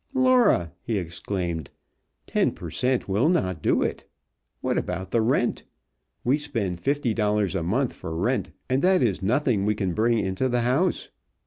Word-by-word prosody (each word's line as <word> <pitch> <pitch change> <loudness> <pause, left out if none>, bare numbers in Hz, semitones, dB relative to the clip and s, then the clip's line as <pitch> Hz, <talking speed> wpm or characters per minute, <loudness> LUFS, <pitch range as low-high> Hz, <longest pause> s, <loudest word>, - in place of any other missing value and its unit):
"Laura!" 255 - +4
he 110 -2 -2
exclaimed. 85 -2 -3 0.6
"Ten - - +1
per - - -8
cent. 125 0 0
will 105 +10 +2
not 95 - 0
do - - +2
it! - - -3 0.6
What - - -1
about 90 +1 -3
the 115 - +2
rent? 120 +1 +1 0.6
We 135 +5 +2
spend 115 - -2
fifty 140 0 0
dollars 105 -3 +1
a 95 - -1
month 115 +10 0
for 80 - -6
rent, 120 +10 0 0.2
and 130 +2 +1
that 185 -5 +4
is 105 -5 0
nothing 115 0 +1
we 105 +1 +1
bring 110 +4 +1
into 95 +5 0
the 120 0 +1
house. 135 +10 +1
110 Hz, 160 wpm, -25 LUFS, 95-130 Hz, 0.6 s, Laura